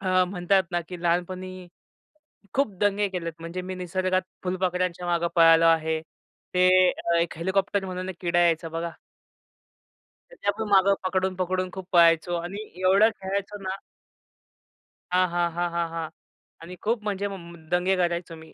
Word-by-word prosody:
अ, 185 Hz, -2 st, +3 dB
म्हणतात 185 Hz, +1 st, +1 dB
ना, 175 Hz, -, +1 dB
की 180 Hz, -1 st, -8 dB
लहानपणी 185 Hz, +1 st, -2 dB, 0.9 s
खूप 270 Hz, -7 st, +1 dB
दंगे 205 Hz, 0 st, +2 dB
केलेत, 175 Hz, -3 st, -4 dB
म्हणजे 170 Hz, +2 st, -5 dB
मी 185 Hz, 0 st, -5 dB
निसर्गात 185 Hz, +1 st, -1 dB, 0.2 s
फुलपाखरांच्या 180 Hz, -1 st, -1 dB
मागे 170 Hz, 0 st, +1 dB
पळालो 165 Hz, 0 st, +7 dB
आहे. 160 Hz, -1 st, +2 dB, 0.5 s
ते 180 Hz, 0 st, +4 dB, 0.5 s
एक 170 Hz, -1 st, -2 dB
हेलिकॉप्टर 190 Hz, +2 st, 0 dB
म्हणून 185 Hz, 0 st, -5 dB
एक 185 Hz, -, -6 dB
किडा 175 Hz, -1 st, +1 dB
यायचा 165 Hz, -1 st, +2 dB
बघा 165 Hz, +1 st, -4 dB, 1.4 s
त्याच्या -, -, -2 dB
पण 220 Hz, -2 st, -2 dB
मागं 195 Hz, 0 st, +5 dB
पकडून, 185 Hz, 0 st, 0 dB
पकडून 185 Hz, 0 st, -1 dB
खूप 190 Hz, -1 st, -7 dB
पळायचो 170 Hz, 0 st, +5 dB
आणि 175 Hz, +4 st, -4 dB, 0.2 s
एवढं 195 Hz, +4 st, +5 dB
खेळायचो 200 Hz, +1 st, -3 dB
ना. 190 Hz, 0 st, -3 dB, 1.4 s
हां, 185 Hz, 0 st, +3 dB
हां, 175 Hz, -1 st, 0 dB
हां, 175 Hz, 0 st, 0 dB
हां, 170 Hz, -1 st, 0 dB
हां 165 Hz, -1 st, -4 dB, 0.5 s
आणि 175 Hz, +2 st, -9 dB
खूप 225 Hz, -2 st, +1 dB
म्हणजे 205 Hz, -1 st, -2 dB, 0.5 s
दंगे 185 Hz, +2 st, +2 dB
करायचो 170 Hz, -1 st, -2 dB
मी. 160 Hz, -, -16 dB
180 Hz, 145 wpm, -25 LUFS, 170-190 Hz, 1.4 s, पळालो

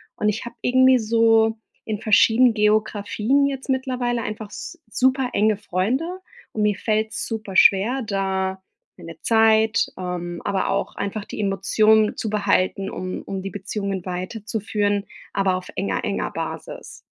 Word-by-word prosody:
Und 210 Hz, -, +1 dB
ich 220 Hz, +3 st, -3 dB
habe 235 Hz, -, -8 dB
irgendwie 260 Hz, +1 st, +5 dB
so 225 Hz, 0 st, +3 dB, 0.3 s
in 215 Hz, -1 st, -4 dB
verschieden 225 Hz, +3 st, +5 dB
Geografien 215 Hz, +4 st, +1 dB
jetzt 270 Hz, 0 st, -5 dB
mittlerweile 250 Hz, -3 st, -1 dB
einfach 215 Hz, -1 st, -5 dB
s -, -, -9 dB
super 260 Hz, +1 st, +1 dB
enge 215 Hz, 0 st, +2 dB
Freunde 255 Hz, -, -2 dB, 0.3 s
und 215 Hz, -, -1 dB
mir 210 Hz, -1 st, +2 dB
fällt's 215 Hz, +2 st, -1 dB
super 215 Hz, -4 st, -5 dB
schwer 210 Hz, +8 st, +5 dB
da 190 Hz, -2 st, -2 dB, 0.4 s
meine 165 Hz, -1 st, -11 dB
Zeit, 220 Hz, -1 st, +3 dB
ähm, 175 Hz, -1 st, -5 dB
aber 200 Hz, -1 st, -1 dB
auch -, -, -2 dB
einfach 200 Hz, +1 st, -4 dB
die -, -, -8 dB
Emotionen 215 Hz, +2 st, +3 dB
zu 220 Hz, -, -3 dB
behalten, 195 Hz, -2 st, +1 dB
um 185 Hz, -2 st, -5 dB
um 195 Hz, -1 st, -5 dB
die 195 Hz, -, -5 dB
Beziehungen 200 Hz, -1 st, -4 dB
weiterzuführen, 205 Hz, +2 st, -2 dB, 0.3 s
aber 195 Hz, -2 st, +1 dB
auf 185 Hz, 0 st, -6 dB
enger 195 Hz, -, -2 dB
enger -, -, -2 dB
Basis. -, -, -7 dB
215 Hz, 145 wpm, -22 LUFS, 195-225 Hz, 0.4 s, irgendwie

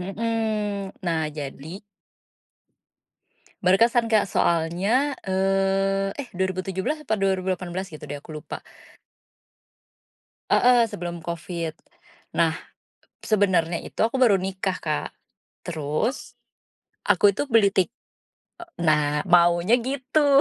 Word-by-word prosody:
Mhm, 210 Hz, 0 st, -2 dB
nah, 160 Hz, -2 st, 0 dB
jadi 150 Hz, +3 st, -7 dB, 1.9 s
Berkesan, 230 Hz, +5 st, +3 dB
Kak, 215 Hz, -2 st, +3 dB
soalnya, 190 Hz, -, +1 dB
eee, 195 Hz, +1 st, +1 dB
eh, 275 Hz, -3 st, -5 dB
2017 190 Hz, -, -2 dB
apa 220 Hz, -, -1 dB
2018 185 Hz, -1 st, -1 dB
gitu 155 Hz, -, -10 dB
deh, 145 Hz, +1 st, -5 dB
aku 155 Hz, +2 st, -11 dB
lupa. 155 Hz, -, -8 dB, 1.9 s
Heeh, 245 Hz, -1 st, +5 dB
sebelum 175 Hz, -4 st, -6 dB
COVID. 170 Hz, -1 st, -4 dB, 0.6 s
Nah, -, -, +3 dB, 0.7 s
sebenarnya 180 Hz, -6 st, +2 dB
itu -, -, -12 dB
aku 230 Hz, +4 st, +1 dB
baru 225 Hz, -7 st, +5 dB
nikah, 190 Hz, 0 st, -2 dB
Kak. 155 Hz, -2 st, -2 dB, 0.5 s
Terus 175 Hz, -, -3 dB, 0.7 s
aku 200 Hz, 0 st, +4 dB
itu -, -, 0 dB
beli 215 Hz, -3 st, +5 dB
tik 190 Hz, -2 st, +2 dB, 0.7 s
eee, 345 Hz, -, -10 dB, 0.2 s
nah, 150 Hz, -1 st, +2 dB
maunya 175 Hz, +3 st, +4 dB
gitu, 275 Hz, +2 st, +2 dB
190 Hz, 100 wpm, -24 LUFS, 170-220 Hz, 1.9 s, Heeh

